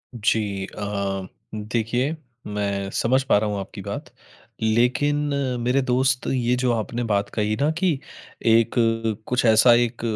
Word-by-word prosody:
जी 105 -3 0
अ, 100 -1 -4 0.3
देखिए, 115 +7 -1 0.3
मैं 100 -1 -2
समझ 130 +3 +2
पा 130 - +3
रहा 105 0 0
हूँ 100 -1 -2
आपकी 95 - -7
बात। - - -6 0.5
लेकिन 125 +6 +2 0.4
मेरे 125 +3 +1
दोस्त, 130 +1 +1
ये 125 -1 +1
जो 125 0 +1
आपने 115 +2 -2
बात 100 -3 0
कही 105 0 0
न 150 +2 +3
कि 170 -6 +1 0.5
एक 115 0 +4 0.5
कुछ 125 0 +1
ऐसा 115 +2 +6
एक 120 0 +1
115 Hz, 140 wpm, -23 LUFS, 105-125 Hz, 0.5 s, ऐसा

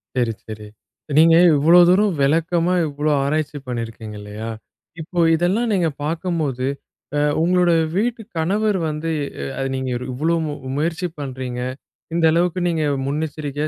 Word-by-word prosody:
செரி, 120 -2 +1 0.2
செரி. 105 -1 -8 0.5
நீங்க 165 +1 +7 0.2
இவ்ளோ 165 +5 +6
தூரம் 195 +2 +4
விளக்கமா 165 +4 +2
இவ்ளோ 145 +1 -1
ஆராய்ச்சி 150 +1 -1
பண்ணிருக்கீங்க 115 -3 -5
இல்லயா, 105 +2 -7 0.5
இப்போ 175 +2 -4
இதெல்லாம் 185 +8 +1
நீங்க 175 -4 +2
பாக்கும்போது, 155 -5 -2 0.5
அ - - +2 0.2
உங்களோட 180 +1 +3 0.2
வீட்டு 230 +3 0 0.2
கணவர் 200 +5 +1
வந்து 155 +2 -3 0.3
அ - - -3 0.2
அத 135 - -1
நீங்க 130 0 -3 0.2
இவ்ளோ 160 +6 +1
மு 150 - -3 0.2
முயற்சி 165 +4 -1
பண்றீங்க, 130 -3 -5 0.5
இந்த 170 -1 +2
அளவுக்கு 175 +2 +1
நீங்க 160 -2 0 0.2
முன்னெச்சரிக்கையா 150 0 -3
155 Hz, 130 wpm, -21 LUFS, 135-175 Hz, 0.5 s, நீங்க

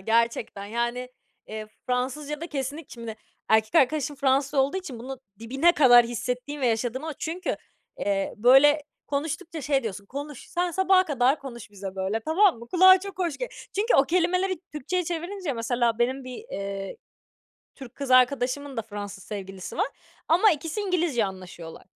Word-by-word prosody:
Gerçekten, 225 -1 0
yani, 240 +3 -2 0.4
eee, 215 0 -6 0.2
Fransızcada 285 +5 -2
kesinlik 285 +1 -5
şimdi, 230 -2 -7 0.3
erkek 220 0 +3
arkadaşım 290 +1 +3
Fransız 275 +1 +1
olduğu 275 +6 +2
için 310 -11 -6
bunu 260 +2 -7 0.2
dibine 270 +9 +3
kadar 245 -6 +7
hissettiğim 250 +4 -4
ve 255 - +2
yaşadım 240 +5 -1
a 320 - -3
çünkü, 340 +6 -3 0.4
eee, 195 -1 -1
böyle 270 +6 +6 0.2
konuştukça 315 +3 -3
şey, 275 -1 +1
diyorsun, 200 -2 -5
"Konuş, 285 +2 -7
sen 350 0 0
sabaha 380 +1 +4
kadar 270 -1 +2
konuş 235 -6 -9
bize 195 -1 -7
böyle, 195 +4 -1
tamam 325 - +3
mı?" 235 0 -11
Kulağa 375 +3 +7
çok 395 -1 -8
hoş 340 -5 -1
g - - -3 0.3
çünkü 430 +5 +2
o 275 - +6
kelimeleri 365 +3 +1
Türkçeye 355 +5 -2
çevirince 345 -1 -3
mesela, 235 0 0
benim 260 +2 0
bir, 255 -1 -7
eee, 195 -1 -5 0.8
Türk 260 -3 -11
kız 275 -2 -5
arkadaşımın 255 +1 +3
da 225 - -1
Fransız 205 -3 -7
sevgilisi 195 -2 -7
var. 405 +6 +2 0.4
Ama 365 +7 +6
ikisi 325 +5 -2
İngilizce 345 - +1
anlaşıyorlar. 185 -3 -8
265 Hz, 155 wpm, -26 LUFS, 230-320 Hz, 0.8 s, kadar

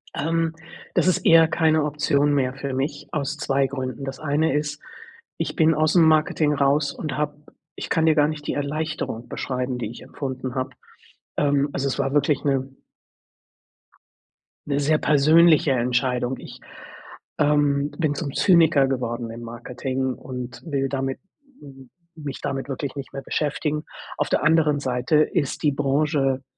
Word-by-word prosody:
Ähm, 165 +1 0 0.4
das - - +3
ist 185 - +1
eher 165 -1 +7
keine 160 -1 +2
Option 145 -1 +1
mehr 130 -3 +1
für 135 0 -5
mich 135 +3 -3
aus 145 -2 -2
2 140 -1 +1
Gründen. 130 -1 -5
Das 135 0 -6
eine 155 +2 +1
ist, 150 0 -3 0.6
ich - - -3
bin 160 0 +4
ausm 155 +2 +3
Marketing 155 -1 +3
raus 140 +1 +2
und 150 -5 -5
habe 150 -1 -1 0.4
ich - - -6
kann 160 -2 +2
dir 160 -1 +4
gar 150 -1 +4
nicht 150 -1 -5
die - - 0
Erleichterung 145 -4 -3
beschreiben, 125 -1 -3
die 115 -4 -4
ich 120 - -10
empfunden 130 -2 -5
habe. 130 -1 -2 0.7
Ähm, 145 0 +2
also 140 0 -1
es 135 - -2
war 135 0 0
wirklich 145 -1 +2
'ne 135 -2 0 2.0
'ne 140 -1 0
sehr 150 +2 +2
persönliche 155 +1 +5
Entscheidung. 125 0 0
Ich, - - -11 0.8
ähm, 145 -1 +2
bin 155 -4 0
zum 140 -2 -4
Zyniker 165 -7 +4
geworden 120 -3 -3
im 115 +1 -8
Marketing 125 +3 -4
und 125 -2 -8
will 140 -4 -1
damit 135 -1 -2 0.4
hm, 135 -3 -13 0.3
mich 145 -4 -7
damit 135 0 -3
wirklich 140 0 -4
nicht 140 -1 -7
mehr 135 - -5
beschäftigen. 150 +1 -2 0.3
Auf - - 0
der - - 0
anderen 155 -1 +3
Seite 130 +2 0
ist 150 -2 0
die 150 - +4
Branche 140 -1 0
140 Hz, 155 wpm, -23 LUFS, 135-150 Hz, 2.0 s, eher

